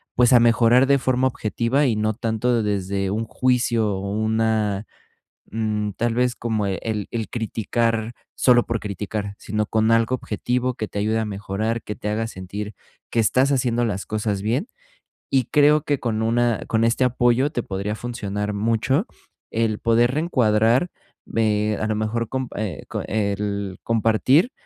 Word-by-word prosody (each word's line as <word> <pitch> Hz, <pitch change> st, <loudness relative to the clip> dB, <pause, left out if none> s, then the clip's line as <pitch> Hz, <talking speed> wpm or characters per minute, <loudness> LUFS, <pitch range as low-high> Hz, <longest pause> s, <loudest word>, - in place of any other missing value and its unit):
pues, 125 Hz, +1 st, +4 dB
a 125 Hz, -, +8 dB
mejorar 120 Hz, +2 st, +4 dB
de 140 Hz, -1 st, +4 dB
forma 130 Hz, 0 st, +2 dB
objetiva 120 Hz, +3 st, 0 dB
y 115 Hz, -, +1 dB
no 110 Hz, 0 st, +1 dB
tanto 115 Hz, +1 st, 0 dB
desde 100 Hz, -1 st, -1 dB
un 110 Hz, +3 st, -1 dB
juicio 120 Hz, -2 st, +1 dB
o 100 Hz, +1 st, -4 dB
una, 110 Hz, -1 st, 0 dB, 0.7 s
mm, 105 Hz, -1 st, -1 dB
tal 115 Hz, +2 st, -1 dB
vez, 125 Hz, 0 st, +1 dB
como 110 Hz, -3 st, -1 dB
e 95 Hz, -, -2 dB
el 105 Hz, -3 st, -2 dB
el 115 Hz, -4 st, -3 dB
criticar 115 Hz, 0 st, -1 dB, 0.2 s
solo 120 Hz, -2 st, +4 dB
por 115 Hz, -1 st, -2 dB
criticar, 100 Hz, 0 st, -4 dB
sino 105 Hz, 0 st, -2 dB
con 110 Hz, 0 st, +2 dB
algo 115 Hz, +2 st, +3 dB
objetivo 125 Hz, +2 st, -2 dB
que 110 Hz, -, -4 dB
te 100 Hz, -, -4 dB
ayude 110 Hz, +2 st, +1 dB
a 110 Hz, -, -1 dB
mejorar, 105 Hz, +3 st, -3 dB
que 105 Hz, -, -5 dB
te 105 Hz, -, -4 dB
haga 115 Hz, +2 st, -1 dB
sentir 100 Hz, +1 st, -6 dB, 0.4 s
que 115 Hz, -, +1 dB
estás 130 Hz, +5 st, +3 dB
haciendo 120 Hz, -2 st, +1 dB
las 100 Hz, -3 st, -3 dB
cosas 105 Hz, -2 st, -2 dB
bien, 120 Hz, -, -1 dB, 0.6 s
y 130 Hz, -3 st, +2 dB
creo 150 Hz, +1 st, +5 dB
que 145 Hz, -3 st, -1 dB
con 110 Hz, -2 st, -1 dB
una 120 Hz, 0 st, +1 dB
con 115 Hz, 0 st, +2 dB
este 115 Hz, +3 st, +2 dB
apoyo 125 Hz, +2 st, +2 dB
te 120 Hz, -, -1 dB
podría 100 Hz, +2 st, -3 dB
funcionar 105 Hz, -4 st, -4 dB
mucho 115 Hz, -, +1 dB, 0.4 s
el 110 Hz, -2 st, 0 dB
poder 120 Hz, +2 st, +3 dB
reencuadrar, 125 Hz, -2 st, +2 dB, 0.4 s
ve 105 Hz, -1 st, 0 dB
a 110 Hz, -, 0 dB
lo 110 Hz, -, 0 dB
mejor 110 Hz, +1 st, -1 dB
comp 130 Hz, -2 st, -4 dB
eh, 100 Hz, -8 st, -4 dB
co -, -, -3 dB
el 100 Hz, -2 st, -2 dB
compartir 115 Hz, -, +3 dB
110 Hz, 165 wpm, -22 LUFS, 105-120 Hz, 0.7 s, a